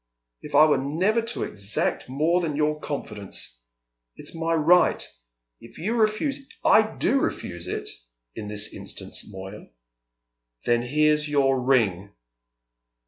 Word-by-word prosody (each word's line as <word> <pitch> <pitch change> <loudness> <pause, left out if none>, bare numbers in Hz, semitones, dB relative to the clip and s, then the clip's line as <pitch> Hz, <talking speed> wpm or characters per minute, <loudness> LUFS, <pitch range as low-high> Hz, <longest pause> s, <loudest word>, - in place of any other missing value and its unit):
If - - -6
I 155 - +8
were 150 -3 +3
never 180 - +1
to 230 +2 -3
exact 100 +4 -2
more 160 +7 +2
than 155 -4 -2
your 150 0 +1
confidence! 105 - -5 0.6
It's - - -7
my 165 0 0
right. 170 +3 +4 0.5
If 115 0 -14
you 205 +8 -2
refuse 225 +5 +1 0.2
" - - -32
"I 220 - +8
do 275 - +2
refuse 85 - -3
it, - - -4 0.5
in 105 - -6
this 105 0 -2
instance, - - -6
Moya." 95 +2 -9 1.0
"Then 120 0 +3
here's 150 +4 +2
your 135 -3 +2
ring!" 105 - +1
145 Hz, 135 wpm, -25 LUFS, 110-165 Hz, 1.0 s, I